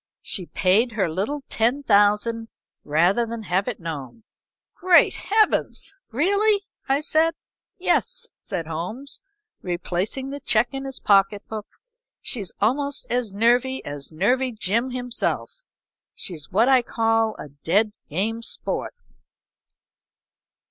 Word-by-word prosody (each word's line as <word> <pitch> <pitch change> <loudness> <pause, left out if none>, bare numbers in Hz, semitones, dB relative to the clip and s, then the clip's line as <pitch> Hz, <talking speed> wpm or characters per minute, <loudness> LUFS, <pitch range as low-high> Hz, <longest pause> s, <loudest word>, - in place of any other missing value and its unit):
She 180 -4 -2
paid 215 +6 +2
her 205 -4 +1
little 205 - -2
ten 245 +6 +1
thousand 210 +1 +3 0.4
rather 175 +10 +3
than 230 -1 -5
have 190 0 0
it 245 - -3
known." 160 - -7 0.5
"Great 360 -1 +5
Heavens! 425 +3 +1
really?" 405 - +2 0.3
I 275 +2 +3
said. 320 +1 +2 0.4
"Yes," 470 +7 +1
said 180 -6 -4
Holmes, 180 - -4 0.4
replacing 185 +9 -3
the 285 - -5
check 240 -4 +2
in 270 0 -5
his 270 -1 -3
pocket 200 0 +3
book. 215 -2 -6 0.5
"She's 205 -8 -3
almost 280 +6 0
as 245 -3 0
nervy 245 +5 +2
as 145 0 -6
Nervy 250 +10 +1
Jim 220 +4 0
himself. 250 - -3 0.5
She's 155 -6 -4
what 220 +6 +4
I 265 -2 +6
call 225 -1 +1
a - - -8
dead 185 +10 +1 0.2
game 215 +8 -1
sport." 230 - -2
225 Hz, 120 wpm, -24 LUFS, 195-265 Hz, 0.5 s, I